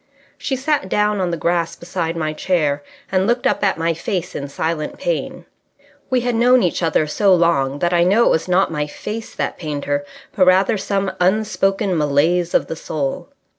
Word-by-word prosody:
She 270 - -3
sat 270 -6 -1
down 210 0 +1
on 180 - 0
the 170 - -2
grass 170 0 0
beside 170 -1 -4
my 155 -1 -2
chair, 155 -4 0 0.3
and 190 0 +2
looked 240 +1 0
up - - +1
at 195 - +2
my 165 +1 0
face 180 +2 -3
in 140 - -5
silent 155 +2 -3
pain. - - -3 0.6
We 255 -1 +2
had 245 0 -1
known 245 +1 +4
each 175 - 0
other 160 -2 +2
so 190 +5 +3
long 145 -6 +1
that 175 +4 0
I 170 0 +4
know 200 +7 +4
that - - +3
it - - +3
was 160 - 0
not 180 0 +2
my 150 -1 -2
face 220 +8 -7
that - - -3
pained 150 -4 -4
her, 145 0 -1 0.3
but 185 -2 +3
rather 190 +3 +4
some 195 -1 -1
unspoken 195 0 +1
malaise 160 +4 +1
of - - +3
the 165 - -5
soul. 145 -4 -4
180 Hz, 200 wpm, -19 LUFS, 160-200 Hz, 0.6 s, known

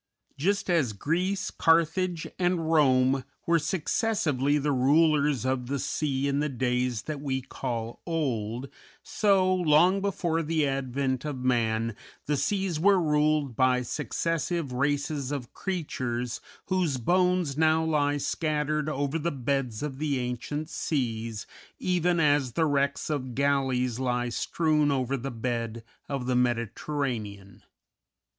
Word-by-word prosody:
Just 195 +8 0
as 160 - +2
Greece, 180 - -1
Carthage, 165 +1 +2
and 175 -3 +1
Rome 130 -3 +4 0.2
were 170 0 +3
successively 150 - 0
the 145 0 0
rulers 145 0 +3
of 130 -1 -1
the 140 +2 -1
sea 140 0 -1
in 140 0 0
the 150 +1 0
days 125 -2 -1
that 150 -2 -5
we 135 -2 -1
call 115 -3 -5
old, 125 -7 -2 0.4
so, 195 -3 +2
long 180 +2 +4
before 175 -5 0
the 160 -1 +1
advent 135 -1 -1
of 140 -4 -4
man, 115 -2 +1 0.3
the 150 - +1
seas 190 +1 -1
were 195 +2 +5
ruled 150 -4 +1
by 130 0 +3
successive 165 +3 -2
races 140 +1 -1
of 135 -5 -5
creatures 125 - -3 0.2
whose 180 -7 0
bones 180 +2 +2
now 160 +1 +3
lie 145 -2 +1
scattered 150 0 -1
over 145 +2 -1
the 165 +2 0
beds 135 -3 -2
of 135 -3 -4
the 150 -3 0
ancient 125 +5 -3
seas, 115 -9 -2 0.3
even 180 -1 +1
as 145 -5 +2
the 165 - +2
wrecks 140 0 0
of 130 -5 -3
galleys 130 -3 +1
lie 125 -1 0
strewn 150 +3 +1
over 135 -1 0
the 135 +1 -4
bed 115 -1 -3 0.3
of 135 -3 -3
the 125 0 0
Mediterranean. 115 -4 -2
140 Hz, 130 wpm, -27 LUFS, 125-160 Hz, 0.4 s, were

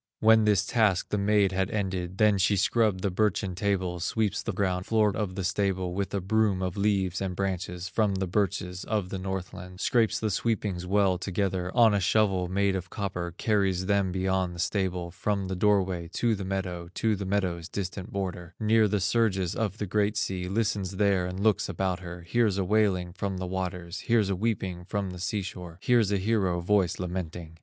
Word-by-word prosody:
When 110 0 +5
this 105 -1 +3
task 105 -5 +2
the 105 - 0
maid 100 -1 +3
had 95 +1 0
ended, 95 -4 -3
Then 105 -1 +4
she 95 +3 +3
scrubbed 105 0 +2
the 100 - +1
birchen 100 -1 0
tables, 90 -2 -1
Sweeps 105 -1 0
the 110 - -3
ground 95 -2 -1
floor 105 -3 +2
of 100 -4 -2
the 95 - -3
stable, 95 -1 0
With 100 +1 -2
a - - +1
broom 100 0 +1
of 90 0 -2
leaves 100 -3 0
and 95 -2 -2
branches 90 -2 -3
From 100 +1 +1
the 95 0 -1
birches 90 -1 -1
of 105 -4 -2
the 95 - -4
Northland, 90 -1 -6
Scrapes 115 0 +2
the 110 -1 -1
sweepings 100 -4 -1
well 95 -2 +2
together 95 -1 -1
On 115 -3 +6
a 100 - +2
shovel 95 -2 +2
made 100 +1 +1
of 90 -2 -4
copper, 90 -4 -4
Carries 95 -4 +1
them 100 -1 +1
beyond 95 -1 0
the - - -9
stable, 90 -1 -1
From 100 +1 -2
the 95 - -2
doorway 95 -3 +1
to 120 -1 +1
the 100 -2 -3
meadow, 90 -3 -3
To 110 -1 +1
the 100 - -5
meadow's 90 -4 -1
distant 95 +3 -5
border, 90 -4 -4
Near 110 0 +4
the 105 0 0
surges 95 -2 +1
of 105 -2 -2
the 105 - -2
great 105 +2 0
sea, 90 -3 -2
Listens 100 -2 -1
there 95 -2 +2
and 90 +1 -5
looks 105 -2 +2
about 95 -1 -1
her, 90 -1 -8
Hears 105 +2 +1
a 100 - +1
wailing 95 -4 +1
from 95 0 -3
the 90 - -3
waters, 90 -1 -4
Hears 110 -4 +2
a - - +1
weeping 95 -4 -2
from 100 0 -3
the 90 - -8
sea 100 +3 -2
shore, 90 -2 -8
Hears 115 -1 +3
a 100 - +2
hero 95 -3 +1
voice 95 0 +1
lamenting. 85 -2 -5
95 Hz, 200 wpm, -28 LUFS, 90-105 Hz, -, On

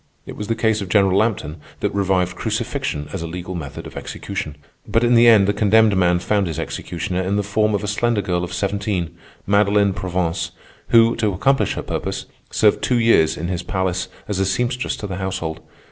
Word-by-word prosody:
It - - -8
was 105 - -5
the 115 - 0
case 110 -2 +1
of 95 - -5
General 95 -1 +3
Lampton 100 -8 0 0.2
that - - -1
revived 95 -2 +1
crucifixion 75 0 -3
as 95 - -3
a 85 - -4
legal 90 +2 -6
method 80 -6 -6
of - - -10
execution. 75 - -5 0.3
But 115 - +2
in 120 0 +3
the 120 0 +6
end 105 -4 +6
the 100 - +2
condemned 105 0 +4
man 90 -1 +3
found 100 +2 0
his 80 - -4
executioner 90 0 -3
in 95 +2 -1
the 105 - +1
form 105 +1 +1
of 100 - -2
a - - -2
slender 105 0 0
girl 90 -1 -1
of 90 - -5
seventeen, 95 -2 -2 0.3
Madeline 100 0 +3
Provence, 90 -3 -2 0.3
who, 115 0 +5
to 105 -3 0
accomplish 135 +9 +2
her - - -4
purpose, - - -4 0.2
served 105 -1 +3
two 125 - +1
years 115 -9 +3
in 85 - -3
his 90 -1 -2
palace 95 0 -2 0.2
as 105 -2 -2
a 95 - +2
seamstress 125 +5 -1
to - - -7
the 95 -3 -4
household. 90 -4 -3
100 Hz, 205 wpm, -21 LUFS, 90-105 Hz, 0.3 s, the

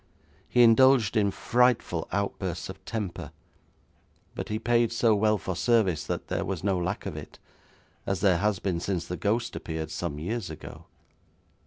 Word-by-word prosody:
He 120 - +5
indulged 120 -1 +5
in 105 -2 +3
frightful 120 -6 +1
outbursts 95 -3 -3
of 95 0 -9
temper, 105 -6 -4 1.0
but - - -6
he 105 - -1
paid 120 0 +2
so 115 -1 +3
well 105 +1 +3
for 95 -1 -4
service 95 - +2
that - - -4
there - - -1
was 95 -3 -4
no 95 -2 +1
lack 90 +3 -3
of - - -4
it, - - -9 0.7
as 95 -2 -1
there 95 -4 +4
has 105 0 +1
been 90 -3 -2
since 90 -1 -2
the 90 - -4
ghost 115 +5 -1
appeared 80 -1 -5
some 85 -5 -4
years 100 +5 -3
ago. 80 - -10
100 Hz, 165 wpm, -27 LUFS, 90-115 Hz, 1.0 s, He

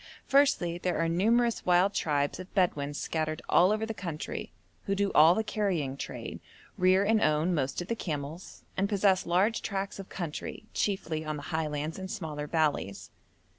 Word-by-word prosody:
Firstly, 180 -12 +3
there 180 0 -1
are 165 - +1
numerous 225 +7 +2
wild 180 +3 +4
tribes 145 0 0
of 185 +1 -9
Bedouin 145 -7 +1
scattered 155 +1 -2
all 180 +3 +5
over 215 +1 0
the 225 - -4
country, 170 -7 -5 0.4
who 195 - +1
do 200 0 +1
all 160 +3 +7
the 220 - 0
carrying 190 -11 -1
trade, - - -6 0.4
rear 185 +1 +4
and 220 +1 +3
own 155 +4 +2
most 140 +2 -1
of - - -12
the 230 - -1
camels, 155 -2 -6
and 195 +1 0
possess 195 -3 +2
large 190 +7 +2
tracts 195 0 -3
of 195 - -8
country, 170 -5 -5
chiefly 165 -6 -1
on 155 -1 -3
the 145 - -8
highlands 155 +1 -2
and 190 0 -6
smaller 155 -7 -4
valleys. 105 - -1
175 Hz, 170 wpm, -29 LUFS, 155-200 Hz, 0.4 s, all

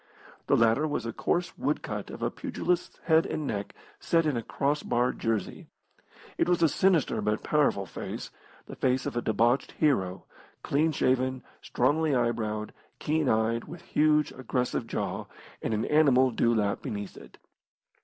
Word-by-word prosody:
The - - +4
latter 115 +7 +3
was 145 -6 -2
a 115 - -4
coarse 165 +5 -1
wood 150 - -1
cut 105 -1 -5
of - - -7
a - - 0
pugilist's 180 -1 -2
head 160 -1 +4
and 155 - -3
neck 100 -6 -4 0.2
set 165 -1 +2
in 150 -4 +1
a 120 - -1
cross 140 +6 -1
barred 120 +1 0
jersey. 110 -4 -2 0.7
It - - +2
was 175 -1 +2
a - - +7
sinister 175 0 +2
but 105 0 -1
powerful 145 -10 +2
face, - - -7 0.3
the - - -9
face 130 0 +1
of - - -4
a 120 - 0
debauched 120 +4 +1
hero, 95 - 0 0.4
clean 155 +3 +2
shaven, 130 -2 0 0.2
strongly 145 +3 +1
eye 120 -1 +2
browed, 110 -2 -4 0.2
keen 155 -2 0
eyed, 110 +1 +1
with 170 - -10
huge, 150 -1 +2
aggressive 125 -2 -2
jaw, - - -3 0.3
and - - -2
an 110 0 0
animal 135 -4 +4
dewlap 110 -3 +1
beneath 100 -2 -5
it. - - -14
130 Hz, 165 wpm, -28 LUFS, 115-150 Hz, 0.7 s, a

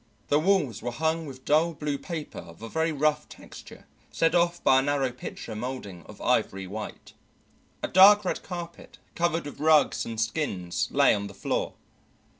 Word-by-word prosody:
The 145 - +4
walls 155 - +1
were 120 - -3
hung 160 +5 -1
with 130 -1 -11
dull 160 +3 +2
blue 145 -1 -3
paper 165 -4 -6
of 85 +5 -13
a 115 - -6
very 160 +3 0
rough 150 0 0
texture - - -13 0.3
set 165 0 +1
off 175 0 +1
by 130 - +5
a - - +2
narrow 140 -2 0
picture 120 -2 -8
moulding 110 -6 -6
of - - -13
ivory 95 0 0
white. 105 +3 -8 0.7
A - - 0
dark 200 +2 +7
red - - -2
carpet 175 -2 -8 0.2
covered 170 -1 0
with 145 - -9
rugs 155 0 +3
and 115 -1 -6
skins 110 - -2
lay - - +4
on 100 0 -3
the 100 - -12
floor. - - -2
145 Hz, 175 wpm, -27 LUFS, 115-165 Hz, 0.7 s, dark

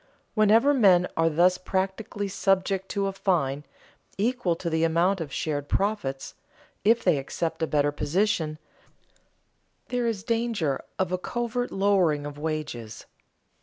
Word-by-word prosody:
Whenever 225 +6 +4
men 185 -8 +5
are 165 0 +3
thus 180 +3 +3
practically 195 +2 -2
subject 195 0 0
to 200 -1 -1
a 195 - 0
fine 150 -8 0 0.5
(equal 215 -4 0
to 170 - -6
the 160 0 +1
amount 170 +3 +2
of 150 -4 -5
shared 145 -1 -3
profits) 190 -10 -1 0.5
if 225 +3 +3
they 170 -6 +3
accept 160 +5 -4
a 160 - +1
better 145 -1 +2
position, 155 +1 0 1.3
there 245 -1 0
is 210 -4 -2
danger 225 - -1
of 185 -1 -1
a 185 - -1
covert 240 +4 -3
lowering 185 -7 +2
of 145 0 -7
wages. 150 -8 -5
185 Hz, 135 wpm, -26 LUFS, 155-205 Hz, 1.3 s, men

